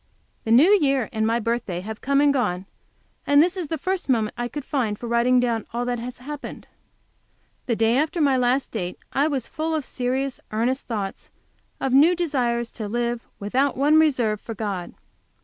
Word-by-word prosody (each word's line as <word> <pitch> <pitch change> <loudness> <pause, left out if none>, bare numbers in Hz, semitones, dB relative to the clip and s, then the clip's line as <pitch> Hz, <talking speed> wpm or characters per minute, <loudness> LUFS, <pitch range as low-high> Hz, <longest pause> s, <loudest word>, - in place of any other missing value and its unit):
The 225 - -1
New 285 - +7
Year 275 - +1
and 220 -1 +1
my 230 +1 +1
birthday 230 -6 -2
have 220 +3 -7
come 280 +1 +2
and 290 -1 +4
gone, 195 -8 -1 0.6
and 285 0 +5
this 350 +4 +4
is 360 -4 -3
the 320 - -2
first 370 +1 -3
moment 225 -4 +1
I 240 0 -2
could 290 +2 -6
find 230 -7 -1
for 240 - -8
writing 235 +2 +3
down 235 -3 0
all 240 +1 -1
that 245 -1 -1
has 245 +1 -6
happened. 290 +3 -8 1.0
The 235 - +1
day 225 +1 +2
after 310 +4 0
my 280 -4 +3
last 255 +2 +1
date 180 -5 -4 0.2
I 280 +3 +3
was 270 -6 -2
full 320 +1 -2
of 300 -4 -2
serious, 260 +1 -2
earnest 240 +5 -1
thoughts, 205 -5 -4 0.5
of 265 -1 -1
new 310 +7 +6
desires 245 -8 -1
to 215 -3 -5
live, 240 +2 -1 0.2
without 255 +7 0
one 295 +3 +5
reserve, 245 -9 +2
for 225 - -7
God. 200 -5 -4
245 Hz, 190 wpm, -24 LUFS, 225-280 Hz, 1.0 s, New